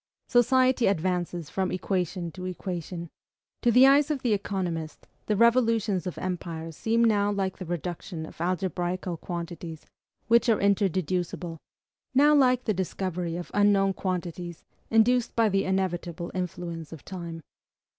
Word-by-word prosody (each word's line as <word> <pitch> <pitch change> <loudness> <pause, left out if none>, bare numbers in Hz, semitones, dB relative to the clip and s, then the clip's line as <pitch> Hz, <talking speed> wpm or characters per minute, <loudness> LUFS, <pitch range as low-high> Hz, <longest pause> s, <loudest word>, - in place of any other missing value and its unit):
Society 255 +1 +4
advances 175 -3 -1
from 190 -1 -1
equation 180 -2 -2
to 185 +3 -8
equation. 175 -2 -5 0.5
To 240 - +3
the 250 +3 +7
eyes 280 +2 +5
of 290 -4 -2
the 235 -4 +2
economist, 180 -6 -3 0.2
the 210 - +2
revolutions 225 -4 +3
of 180 - -5
empires 165 -3 -4
seem 230 +6 +1
now 205 -3 +3
like 195 -2 -2
the 185 - -5
reduction 175 -1 -4
of - - -11
algebraical 180 0 -2
quantities, 170 -2 -6 0.4
which 235 +2 +4
are 220 - +4
inter 200 0 +3
deducible; 175 -1 -3 0.6
now 295 +3 +6
like 255 -3 +4
the 215 - +1
discovery 180 -2 -3
of 175 0 -6
unknown 200 -1 +4
quantities, 175 -2 -4 0.3
induced 235 +2 +3
by 225 -2 +4
the 195 0 +1
inevitable 175 -2 -2
influence 175 -3 -4
of 160 -4 -10
time. 170 -3 -6
185 Hz, 140 wpm, -27 LUFS, 175-215 Hz, 0.6 s, the